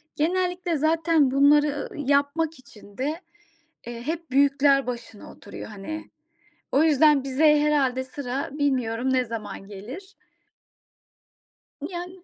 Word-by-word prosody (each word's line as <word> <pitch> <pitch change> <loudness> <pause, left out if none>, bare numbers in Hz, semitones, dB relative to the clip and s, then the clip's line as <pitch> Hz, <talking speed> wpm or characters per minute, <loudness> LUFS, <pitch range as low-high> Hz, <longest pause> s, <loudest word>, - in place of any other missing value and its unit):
genellikle 355 +1 0
zaten 315 -2 +2
bunları 290 +1 +3
yapmak 290 +2 0
için 210 -6 -17
de, 300 +7 -2 0.7
eee, 235 -1 -6
hep 325 -3 -4
büyükler 275 -1 +3
başına 235 -3 -7
oturuyor, 200 - -10
hani. 220 +10 -7 0.6
O 280 +4 +4
yüzden 295 -2 +4
bize 295 +3 +3
herhâlde 265 -4 +1
sıra, 265 0 -4
bilmiyorum 260 -4 0
ne 255 -1 +2
zaman 220 -3 -7
gelir? 255 - -10 1.8
Yani 360 0 -8
285 Hz, 110 wpm, -25 LUFS, 255-315 Hz, 1.8 s, O